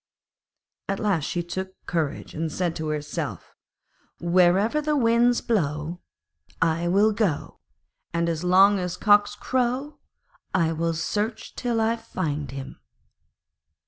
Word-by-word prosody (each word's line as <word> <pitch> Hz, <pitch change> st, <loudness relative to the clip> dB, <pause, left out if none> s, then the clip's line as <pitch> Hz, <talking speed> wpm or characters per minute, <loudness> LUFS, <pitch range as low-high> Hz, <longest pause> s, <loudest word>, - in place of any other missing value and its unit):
At 195 Hz, -, -1 dB
last 195 Hz, -8 st, +1 dB
she 175 Hz, +2 st, -2 dB
took 190 Hz, +2 st, -5 dB
courage 160 Hz, -4 st, -2 dB
and 160 Hz, 0 st, -3 dB
said 175 Hz, 0 st, -1 dB
to 160 Hz, -1 st, -3 dB
herself: 150 Hz, -, -4 dB, 0.7 s
'Wherever 185 Hz, -, +3 dB
the 300 Hz, 0 st, 0 dB
winds 235 Hz, 0 st, +3 dB
blow, 160 Hz, -5 st, -1 dB, 0.6 s
I 165 Hz, +1 st, +1 dB
will 200 Hz, +5 st, +4 dB
go, 205 Hz, -8 st, -1 dB, 0.5 s
and 170 Hz, 0 st, 0 dB
as 165 Hz, 0 st, -2 dB
long 190 Hz, +3 st, +5 dB
as 180 Hz, 0 st, -3 dB
cocks 205 Hz, 0 st, +4 dB
crow, 255 Hz, +6 st, -1 dB, 0.6 s
I 165 Hz, -3 st, +2 dB
will 165 Hz, +1 st, -1 dB
search 210 Hz, +7 st, -2 dB
till 240 Hz, -2 st, -1 dB
I 225 Hz, +1 st, +1 dB
find 155 Hz, -, -3 dB
him.' 135 Hz, 0 st, -7 dB
180 Hz, 125 wpm, -25 LUFS, 165-220 Hz, 0.7 s, long